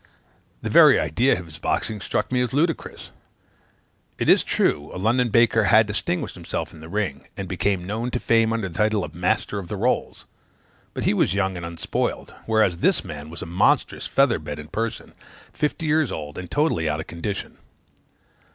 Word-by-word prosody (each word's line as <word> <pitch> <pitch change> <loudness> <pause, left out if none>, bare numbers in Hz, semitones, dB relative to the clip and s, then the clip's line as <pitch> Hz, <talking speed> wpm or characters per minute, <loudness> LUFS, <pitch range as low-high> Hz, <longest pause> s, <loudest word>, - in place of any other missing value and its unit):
The - - -2
very - - +7
idea 115 - +2
of 90 - -8
his 80 -1 -11
boxing 105 +5 -2
struck - - -2
me 125 -1 +2
as 125 -1 -1
ludicrous. 165 +4 -1 1.1
It - - 0
is - - +6
true, 75 0 0
a - - -7
London 120 +6 +2
baker 115 0 +4
had 110 +3 +6
distinguished 105 -3 -2
himself - - -5
in - - -12
the 80 +1 -11
ring, 100 -7 -3
and 95 - -4
became 95 0 -1
known 110 +5 -3
to 125 - -2
fame 115 -1 +3
under 115 -4 -1
the 85 - -11
title 105 -2 +1
of - - -6
the 85 - -13
Master 105 +2 0
of 95 - -8
the 105 - -4
Rolls; 120 +6 -1 0.7
but - - -3
he - - +2
was 95 - +1
young 95 -2 0
and 85 - -6
unspoiled: 85 0 -3
whereas 110 -6 +2
this - - +2
man 75 0 -7
was 85 - -7
a - - -6
monstrous 85 +3 +1
feather 135 -8 +3
bed 75 -1 -6
in 75 0 -9
person, 115 0 -4 0.4
fifty 150 +2 -2
years 155 -3 +2
old, 75 -1 -6
and 90 - -8
totally 145 - +1
out 75 0 -1
of - - -5
condition. 95 +4 -5
100 Hz, 195 wpm, -23 LUFS, 85-115 Hz, 1.1 s, very